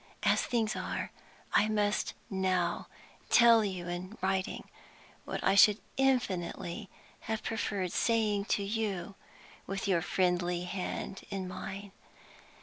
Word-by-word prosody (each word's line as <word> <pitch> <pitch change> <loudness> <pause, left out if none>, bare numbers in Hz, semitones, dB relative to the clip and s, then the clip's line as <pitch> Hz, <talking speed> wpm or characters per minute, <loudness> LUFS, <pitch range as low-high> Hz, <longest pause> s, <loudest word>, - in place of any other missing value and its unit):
As - - +4
things 225 -3 0
are, - - -3 0.4
I 215 - +4
must 210 -1 0
now 185 -2 0 0.4
tell 230 -2 +7
you 185 -4 -3
in 180 +4 -5
writing 190 0 -1 0.6
what - - -4
I 195 - +4
should 205 +1 +7 0.2
infinitely 195 -10 0 0.4
have 220 0 -1
preferred 200 -5 -2
saying 215 -3 +1
to 205 - 0
you 200 -3 -2 0.5
with 195 +1 -3
your 180 -4 +3
friendly 180 0 +1
hand 190 +1 -4
in 190 -2 -3
mine. 195 +2 -6
195 Hz, 120 wpm, -31 LUFS, 180-215 Hz, 0.6 s, tell